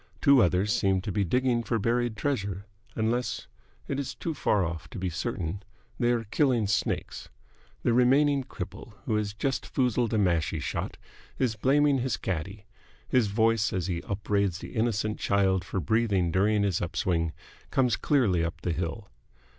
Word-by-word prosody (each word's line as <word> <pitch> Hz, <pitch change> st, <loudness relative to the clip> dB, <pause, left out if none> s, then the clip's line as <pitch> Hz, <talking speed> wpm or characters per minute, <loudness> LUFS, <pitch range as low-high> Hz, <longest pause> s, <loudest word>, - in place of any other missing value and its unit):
Two 140 Hz, -3 st, +6 dB
others 95 Hz, +2 st, +2 dB
seem 95 Hz, -1 st, +2 dB
to 100 Hz, -, -4 dB
be 100 Hz, +2 st, +1 dB
digging 125 Hz, +5 st, +1 dB
for 115 Hz, 0 st, -1 dB
buried 115 Hz, +1 st, 0 dB
treasure, 100 Hz, -, -2 dB, 0.3 s
unless 115 Hz, +3 st, -1 dB, 0.4 s
it 140 Hz, -, -2 dB
is 140 Hz, -, -4 dB
too 165 Hz, -, -3 dB
far 105 Hz, -9 st, +1 dB
off 85 Hz, 0 st, -5 dB
to -, -, -8 dB
be 95 Hz, -1 st, -2 dB
certain 85 Hz, +2 st, -3 dB, 0.4 s
they 120 Hz, 0 st, +3 dB
are 120 Hz, -1 st, 0 dB
killing 120 Hz, 0 st, +1 dB
snakes. 100 Hz, 0 st, -2 dB, 0.5 s
The 120 Hz, -, +2 dB
remaining 135 Hz, +3 st, +4 dB
cripple, 100 Hz, -2 st, -8 dB
who 110 Hz, -, -1 dB
has 105 Hz, -1 st, -1 dB
just 135 Hz, +4 st, -1 dB
foozled 125 Hz, -3 st, +1 dB
a 110 Hz, -, +1 dB
mashie 85 Hz, -6 st, +1 dB
shot, -, -, -4 dB, 0.4 s
is 125 Hz, -4 st, 0 dB
blaming 140 Hz, +4 st, +3 dB
his 130 Hz, 0 st, -1 dB
caddie. 95 Hz, +4 st, -4 dB, 0.4 s
His 125 Hz, -4 st, +3 dB
voice, 110 Hz, +1 st, +2 dB
as 90 Hz, -3 st, -1 dB
he 85 Hz, -2 st, -2 dB
upbraids 100 Hz, -2 st, -1 dB
the -, -, -9 dB
innocent 110 Hz, -2 st, 0 dB
child 95 Hz, -2 st, +2 dB
for 95 Hz, -, -3 dB
breathing 100 Hz, -5 st, +1 dB
during 105 Hz, +4 st, +2 dB
his 95 Hz, -4 st, 0 dB
up 85 Hz, -, -4 dB
swing, 85 Hz, -3 st, 0 dB, 0.4 s
comes 125 Hz, -4 st, +2 dB
clearly 105 Hz, -, +2 dB
up 85 Hz, 0 st, -4 dB
the 85 Hz, -, -1 dB
hill. 85 Hz, +5 st, -4 dB
105 Hz, 170 wpm, -28 LUFS, 95-120 Hz, 0.5 s, Two